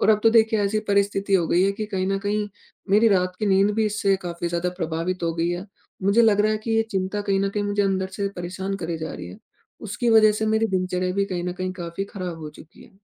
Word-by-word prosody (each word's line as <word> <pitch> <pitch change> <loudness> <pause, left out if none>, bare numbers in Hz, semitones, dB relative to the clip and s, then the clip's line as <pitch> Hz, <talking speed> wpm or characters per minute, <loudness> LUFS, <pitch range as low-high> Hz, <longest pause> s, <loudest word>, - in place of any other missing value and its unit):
और - - +2
अब 210 - +3
तो 225 - +6
देखिए 220 -1 +4
ऐसी 205 +2 0
परिस्थिति 200 0 +1
हो 175 -3 +3
गई 175 +2 +3
है 195 - +3
कि 215 +2 -4
कहीं 185 -1 0
न 195 0 0
कहीं, 205 +1 -1 0.4
मेरी 215 +3 +5
रात 185 -2 +1
की 215 - -1
नींद 195 +1 +4
भी 220 - +1
इससे 200 -2 +1
काफ़ी 170 0 -3
ज़्यादा 175 +1 -1
प्रभावित 170 +2 -2
हो 165 -1 0
गई 170 +1 0
है, 175 +2 -3 0.4
मुझे 200 +5 +4
लग 210 -2 +4
रहा 215 +1 +3
है 215 - -1
कि 230 - -1
ये 225 - +4
चिंता 195 0 -2
कहीं 200 -1 0
न 195 - +1
कहीं 205 +1 -2
मुझे 205 0 0
अंदर 190 -1 0
से 200 -1 -1
परेशान 185 +3 -4
करे 165 -3 -4
जा 160 0 -5
रही 85 0 -7
है। 90 - -11 0.4
उसकी 230 +4 -1
वजह 215 -1 +6
से 220 +1 -2
मेरी 220 +1 +2
दिनचर्या 185 -2 -1
भी 200 0 +1
कहीं 180 -3 -4
न 180 - -2
कहीं 185 +1 -4
काफ़ी 175 +1 -5
खराब 180 -4 -5
हो 155 -2 -7
चुकी 155 +2 -16
है। 205 - -21
195 Hz, 260 wpm, -23 LUFS, 180-210 Hz, 0.4 s, तो